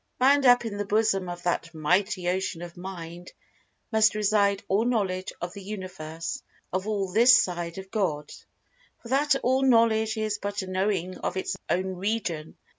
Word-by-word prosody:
Bound 270 +1 +4
up 245 -1 +6
in 210 -3 -4
the 205 - -2
bosom 205 -3 +1
of 175 0 -7
that 165 -1 -2
Mighty 180 +4 +1
Ocean 180 -1 -1
of 175 -1 -9
Mind 175 -1 -8 0.6
must 220 -1 +4
reside 205 -1 +2
all 200 +3 +2
Knowledge 195 -6 -1
of 175 0 -5
the 200 - -9
Universe—of 185 -1 -6
all 200 -3 -1
"this 240 +5 +7
side 175 -3 -2
of 190 0 -9
God." 155 -9 -2 0.7
For 235 - -10
that 280 +2 +3
All 260 +2 +2
Knowledge 230 -3 +3
is 215 -1 -1
but 205 -1 -3
a - - -8
knowing 185 -1 -1
of 185 - -3
its 190 - -2
own 185 +2 -1
region. 185 -6 -3
195 Hz, 165 wpm, -26 LUFS, 180-220 Hz, 0.7 s, this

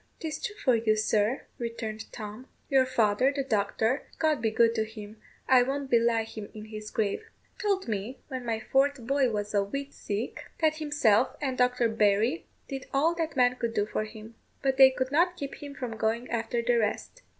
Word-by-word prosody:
"'Tis 315 -2 -5
true 405 - -3
for 270 - +2
you, 220 -1 +2
sir," 215 +3 +1 0.2
returned 225 -2 -5
Tom; 215 +3 -8 0.2
"your 265 -1 +5
father, 235 +1 +3
the 280 -1 -2
doctor 220 +2 0
(God 310 -5 +1
be 220 - +2
good 230 +1 +3
to 220 - +1
him, 215 -1 -10 0.3
I 255 -1 +7
won't 275 +2 -2
belie 230 -1 +3
him 215 -2 -8
in 215 0 -8
his 215 -1 -7
grave), 220 - -2 0.3
told 390 -4 0
me, 220 +4 -3
when 260 -3 -5
my 225 -2 -1
fourth 270 +1 +1
boy 275 0 +2
was 210 -2 -3
a 200 - +3
week 275 +7 -5
sick, 210 +4 -4
that 310 -1 +2
himself 280 -7 +2
and 265 -3 -1
Dr. 250 -1 +2
Barry 220 +6 +2 0.2
did 270 -2 -6
all 305 +5 +3
that 325 -3 -3
man 250 -1 +3
could 235 -2 -2
do 205 -1 +2
for 215 0 -2
him; 215 +1 -11 0.3
but 265 -1 +1
they 265 -1 +9
could 260 0 -2
not 350 +4 +3
keep 280 -1 -6
him 285 -1 -8
from 240 -5 -5
going 225 +3 0
after 235 0 -1
the 240 0 +3
rest. 230 - -2
240 Hz, 195 wpm, -28 LUFS, 220-275 Hz, 0.3 s, they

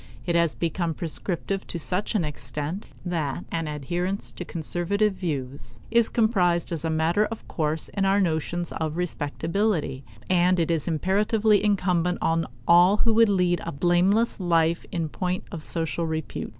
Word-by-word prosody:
It 170 - 0
has 170 -2 +2
become 170 -1 -1
prescriptive 180 +4 -3
to - - -4
such 180 +7 0
an 180 -6 +2
extent 150 +5 -5 0.2
that 165 -3 -2
an 165 -1 -2
adherence 175 +7 -2
to - - -7
conservative 180 +5 -1
views 135 - -5
is 235 -1 +4
comprised 180 -8 +2
as 165 -2 -2
a 165 - 0
matter 160 +6 +2
of 220 +1 -7
course 155 0 -1
in 200 - -2
our 195 +1 +3
notions 170 -1 -1
of 160 0 -3
respectability; 165 -2 -1 0.2
and 180 0 +3
it 165 0 +1
is 160 -3 -1
imperatively 205 +5 +2
incumbent 180 -4 +1
on 165 0 +1 0.2
all 175 +4 +6
who 225 +1 +2
would 225 0 +5
lead 180 -3 +2
a 170 - -4
blameless 180 +10 +2
life 170 -2 +1
in 165 -2 -1
point 180 +4 -2
of 165 - -6
social 165 +1 -1
repute. 160 -1 -4
175 Hz, 160 wpm, -25 LUFS, 160-195 Hz, 0.2 s, all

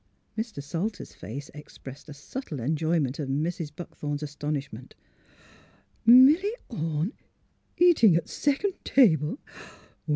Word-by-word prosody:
Mr. 220 -10 -4
Salter's 180 +8 -4
face 130 +10 -8
expressed 145 -1 -12
a - - -7
subtle 155 - -7
enjoyment 155 +1 0
of 140 -3 -3
Mrs. 155 +3 -2
Buckthorn's 150 -3 -5
astonishment. 145 -4 -5 0.6
" - - -31
Milly 295 - +7
Orne— 165 - -2 0.6
eatin' 325 - +6
at 170 - 0
second 295 +8 0
table? 170 - +3
160 Hz, 105 wpm, -27 LUFS, 145-230 Hz, 0.6 s, Milly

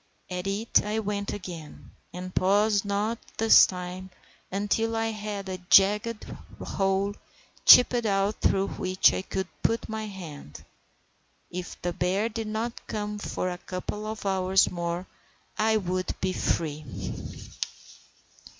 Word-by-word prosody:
At 180 +1 -3
it 205 +3 +2
I 210 +1 -2
went 205 -2 -2
again, 170 -6 -8 0.2
and 180 +1 -7
paused 205 +2 +3
not 210 +3 -1 0.2
this 225 0 +8
time 180 0 -6 0.4
until 205 +3 0
I 225 0 0
had 210 -2 -5
a 185 -1 -4
jagged 210 +4 +5 0.4
hole 195 +1 0 0.5
chipped 245 -2 +8
out 200 +1 +1
through 195 0 +2
which 185 0 +3
I - - -1
could 190 0 -3
put 230 0 0
my 220 0 -4
hand. 145 - -9 0.9
If 180 0 -6
the 175 0 -1
bear 190 +6 0
did 225 -1 -4
not 225 +2 -4
come 210 0 -3
for 185 -2 -2
a 180 - -6
couple 200 +4 -5
of 215 -1 -6
hours 190 0 +3
more 175 +1 -3 0.5
I 220 0 +4
would 185 -2 -2
be 185 0 0
free. 155 -4 -1
195 Hz, 130 wpm, -27 LUFS, 185-215 Hz, 0.9 s, this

